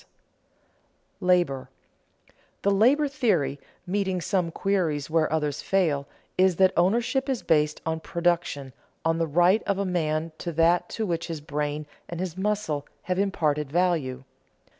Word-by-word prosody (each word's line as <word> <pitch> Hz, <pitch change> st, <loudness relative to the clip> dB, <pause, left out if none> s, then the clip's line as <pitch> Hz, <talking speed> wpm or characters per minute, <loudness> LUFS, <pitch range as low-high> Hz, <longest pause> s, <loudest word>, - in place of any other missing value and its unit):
[Sidenote: 180 Hz, -, -5 dB
Labor] 175 Hz, -8 st, +2 dB, 0.9 s
The 200 Hz, -, +3 dB
labor 255 Hz, +9 st, +4 dB
theory, 180 Hz, -, 0 dB, 0.3 s
meeting 190 Hz, -1 st, -1 dB
some 180 Hz, -1 st, 0 dB
queries 165 Hz, -6 st, -1 dB
where 160 Hz, -1 st, +2 dB
others 150 Hz, -2 st, -1 dB
fail, 155 Hz, -8 st, +1 dB, 0.3 s
is 185 Hz, -1 st, +5 dB
that 190 Hz, +1 st, +4 dB
ownership 240 Hz, +9 st, +2 dB
is 260 Hz, -3 st, -1 dB
based 150 Hz, -1 st, +2 dB
on 160 Hz, 0 st, -1 dB
production, 170 Hz, -6 st, -1 dB, 0.3 s
on 165 Hz, 0 st, +2 dB
the 165 Hz, -, +1 dB
right 175 Hz, +7 st, +4 dB
of 200 Hz, -1 st, +1 dB
a 200 Hz, -, 0 dB
man 165 Hz, -3 st, -1 dB
to 170 Hz, -, -3 dB
that 165 Hz, +2 st, +3 dB
to 220 Hz, -, -2 dB
which 170 Hz, -3 st, -2 dB
his 165 Hz, -2 st, -4 dB
brain 150 Hz, 0 st, -3 dB, 0.2 s
and 170 Hz, -, -5 dB
his 180 Hz, -2 st, -3 dB
muscle 190 Hz, -7 st, -1 dB, 0.2 s
have 180 Hz, +1 st, -1 dB
imparted 150 Hz, -7 st, 0 dB
value. 160 Hz, -7 st, 0 dB
170 Hz, 145 wpm, -26 LUFS, 150-190 Hz, 0.9 s, is